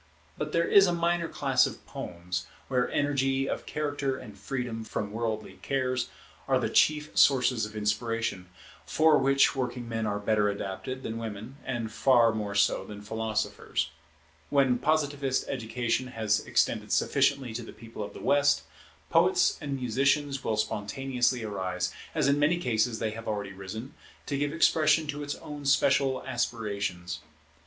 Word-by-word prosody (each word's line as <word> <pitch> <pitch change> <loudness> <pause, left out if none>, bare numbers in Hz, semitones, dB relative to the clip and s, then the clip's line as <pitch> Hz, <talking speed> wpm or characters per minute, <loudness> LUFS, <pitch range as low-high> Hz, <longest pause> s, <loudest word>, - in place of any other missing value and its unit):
But 150 0 -4
there 170 +1 +2
is 195 -1 +7
a 175 - +1
minor 170 0 +1
class 135 -5 +2
of - - -9
poems, 90 +1 -5 0.2
where 125 -2 +1
energy 135 -2 +1
of - - -4
character 145 -3 -2
and 105 -7 -10
freedom 115 +2 -4
from 105 -2 -4
worldly 110 -1 -3
cares 130 -2 -1 0.4
are - - +3
the - - -1
chief 150 0 +3
sources 125 -5 +4
of 105 - -13
inspiration, 105 -3 -1 0.3
for 155 -1 +4
which 135 -1 +4
working 125 -2 -3
men 115 -1 -2
are 105 0 -1
better 105 0 +2
adapted 100 +6 -5
than 115 0 -4
women, 115 +4 -7
and 120 -4 -3
far 120 -1 +4
more 105 -2 -3
so 100 - +3
than 105 -1 -9
philosophers. 110 -7 -2 0.6
When 135 -3 +3
Positivist 145 -3 0
education 120 0 -1
has 110 -4 +1
extended - - +1
sufficiently 135 -5 +2
to 120 - -4
the 115 - -9
People 115 0 -10
of 105 - -6
the - - -8
West, 145 0 +3 0.5
poets - - +4
and 140 -1 -3
musicians 135 +3 +1
will 110 - 0
spontaneously 120 +3 0
arise, 95 -4 -2 0.2
as 150 -4 +2
in 140 +1 +3
many 155 +4 +3
cases 115 -7 0
they 110 -1 -1
have 115 +1 -8
already 100 -2 -3
risen, 105 +7 -7 0.3
to 145 - -2
give 145 +1 0
expression 155 -1 +3
to 145 0 -3
its 145 0 -3
own 145 -1 -8
special 135 -1 +3
aspirations. 100 -8 -2
125 Hz, 155 wpm, -28 LUFS, 110-140 Hz, 0.6 s, is